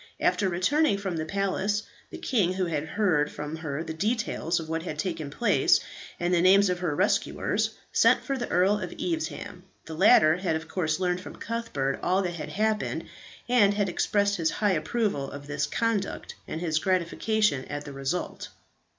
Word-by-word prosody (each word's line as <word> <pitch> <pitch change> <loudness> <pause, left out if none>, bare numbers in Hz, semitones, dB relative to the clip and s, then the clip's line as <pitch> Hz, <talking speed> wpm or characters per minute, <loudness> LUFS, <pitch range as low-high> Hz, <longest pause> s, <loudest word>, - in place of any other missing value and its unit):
After 195 - +2
returning 200 - +2
from 195 -3 -3
the 155 - -2
palace 200 +2 0 0.3
the - - -8
king, 200 -9 +1
who 185 0 -1
had 155 -3 -2
heard 165 -7 +1
from 150 +2 -5
her 155 -1 -4
the 160 -1 -5
details 190 -3 -1
of 160 - -7
what 165 +1 -2
had 155 -3 -5
taken 160 -3 -3
place, 145 - +3 0.4
and 175 +1 0
the 170 - +4
names 190 +1 +5
of 180 - -2
her 170 -5 -1
rescuers, - - +1 0.2
sent - - +4
for 275 - -2
the 245 -2 -4
Earl 190 +4 +3
of 185 -3 -5
Evesham. 330 -2 -4 0.2
The 160 - -7
latter 170 -2 +6
had 180 -3 -1
of 160 +1 -4
course 160 -2 -1
learned 180 -1 0
from - - -9
Cuthbert 210 -13 -3
all 185 +2 +2
that 175 -1 -2
had 155 -3 -6
happened, 215 +5 -1 0.4
and 210 -5 +4
had 205 -2 +1
expressed 200 +3 +1
his 165 -2 +1
high 210 -2 +1
approval 160 - -1
of 140 0 -9
his 145 +1 -2
conduct, 220 +3 -2
and 160 - -5
his 160 -3 +1
gratification 185 -2 +1
at 145 0 -6
the 140 - -8
result. 135 +6 -3
180 Hz, 185 wpm, -27 LUFS, 155-205 Hz, 0.4 s, latter